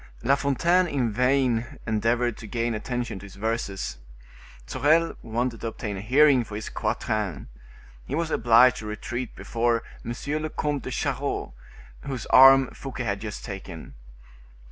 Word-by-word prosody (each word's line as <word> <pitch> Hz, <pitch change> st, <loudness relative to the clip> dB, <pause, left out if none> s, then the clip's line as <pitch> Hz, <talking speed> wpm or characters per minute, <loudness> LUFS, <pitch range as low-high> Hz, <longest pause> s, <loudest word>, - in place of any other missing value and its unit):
La 135 Hz, -, +4 dB
Fontaine 170 Hz, +6 st, +2 dB
in 130 Hz, -7 st, 0 dB
vain 125 Hz, -1 st, +1 dB
endeavored 115 Hz, +2 st, +1 dB
to 110 Hz, -, -10 dB
gain 115 Hz, +1 st, -1 dB
attention 120 Hz, -1 st, -3 dB
to 100 Hz, -, -10 dB
his 95 Hz, -, -14 dB
verses; 100 Hz, -, -3 dB, 0.7 s
Sorel 160 Hz, -, +2 dB
wanted 115 Hz, +1 st, -2 dB
to -, -, -3 dB
obtain 110 Hz, -2 st, -5 dB
a 95 Hz, -, -5 dB
hearing 135 Hz, +3 st, +5 dB
for 105 Hz, -2 st, -9 dB
his 105 Hz, -, -5 dB
quatrain. 105 Hz, -6 st, -2 dB, 0.6 s
He 135 Hz, -, -2 dB
was 165 Hz, 0 st, -1 dB
obliged 120 Hz, +2 st, +5 dB
to 110 Hz, -, -7 dB
retreat 120 Hz, +3 st, -5 dB
before 115 Hz, 0 st, 0 dB, 0.2 s
M. 120 Hz, -, -4 dB, 0.3 s
le 155 Hz, -, -3 dB
Comte 145 Hz, -2 st, -2 dB
de -, -, -6 dB
Charost, -, -, -2 dB, 0.5 s
whose 130 Hz, -4 st, -4 dB
arm 135 Hz, 0 st, +8 dB
Fouquet 130 Hz, -2 st, -6 dB
had 100 Hz, -3 st, -2 dB
just 105 Hz, -2 st, -6 dB
taken. 95 Hz, -4 st, -8 dB
120 Hz, 150 wpm, -25 LUFS, 110-135 Hz, 0.7 s, arm